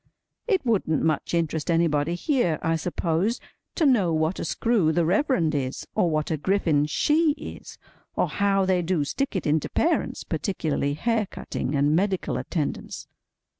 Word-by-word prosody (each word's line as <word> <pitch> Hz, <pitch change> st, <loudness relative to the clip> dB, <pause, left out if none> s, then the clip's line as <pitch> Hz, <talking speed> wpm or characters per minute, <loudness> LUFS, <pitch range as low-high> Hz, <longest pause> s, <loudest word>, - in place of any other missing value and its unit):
It 385 Hz, -, +1 dB
wouldn't 190 Hz, -, +1 dB
much 160 Hz, +2 st, 0 dB
interest 160 Hz, -1 st, -1 dB
anybody 165 Hz, -1 st, +2 dB
here, 210 Hz, -, +1 dB
I 165 Hz, 0 st, +1 dB
suppose, 175 Hz, +6 st, -1 dB, 0.4 s
to 325 Hz, -, +2 dB
know 220 Hz, -, +3 dB
what 160 Hz, +3 st, 0 dB
a -, -, -3 dB
screw 220 Hz, -9 st, +1 dB
the 170 Hz, 0 st, +1 dB
Reverend 180 Hz, -, +2 dB
is, 135 Hz, -2 st, -3 dB
or 175 Hz, -, +2 dB
what 155 Hz, -1 st, -1 dB
a 160 Hz, -, 0 dB
griffin 155 Hz, -4 st, +1 dB
she 300 Hz, -, +2 dB
is, -, -, -10 dB, 0.4 s
or -, -, +1 dB
how 195 Hz, -1 st, +1 dB
they 185 Hz, -1 st, +2 dB
do 170 Hz, -3 st, 0 dB
stick 275 Hz, -, -2 dB
it 190 Hz, -, -2 dB
into 150 Hz, 0 st, +1 dB
parents—particularly 165 Hz, -, -1 dB
hair 225 Hz, +4 st, 0 dB
cutting, 135 Hz, -5 st, -4 dB
and 145 Hz, +2 st, +3 dB
medical 190 Hz, +1 st, 0 dB
attendance. 155 Hz, -5 st, -4 dB
170 Hz, 155 wpm, -25 LUFS, 155-205 Hz, 0.4 s, know